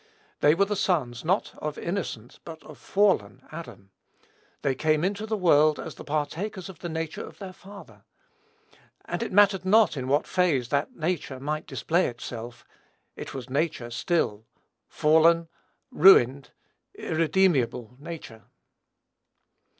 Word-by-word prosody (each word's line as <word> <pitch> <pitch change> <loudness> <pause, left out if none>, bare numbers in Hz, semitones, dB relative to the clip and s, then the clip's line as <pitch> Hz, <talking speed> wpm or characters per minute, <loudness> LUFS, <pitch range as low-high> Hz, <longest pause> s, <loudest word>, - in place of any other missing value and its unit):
They 150 +2 +4
were 200 +3 +3
the 210 +1 -2
sons, 150 -11 -1
not 185 +5 0
of 150 -1 -4
innocent, 170 - -5
but 160 -1 -10
of - - -13
fallen 200 0 +1
Adam. 110 - -10 0.7
They 135 - +1
came 155 +3 +1
into 205 +3 -2
the 220 0 -1
world 155 -5 +4
as - - -6
the - - -11
partakers 165 +6 -3
of 185 - -12
the 175 - -5
nature 160 -1 -4
of - - -12
their 190 -2 -8
father; 200 +2 -14 1.0
and - - -4
it 235 - -3
mattered 195 -1 +4
not 205 -1 +4
in 130 -2 -4
what 145 +3 +2
phase 160 -10 +1
that 140 - -1
nature 155 -5 -3
might 150 +3 -4
display 175 +3 0
itself, 120 0 -8 0.5
it - - -8
was 130 -2 -6
nature 135 -3 -2
still, 120 -4 -1 0.4
fallen, 165 +2 +3 0.4
ruined, 140 -7 +5 0.5
irremediable 155 - 0
nature. 145 -8 -9
160 Hz, 135 wpm, -26 LUFS, 135-185 Hz, 1.0 s, ruined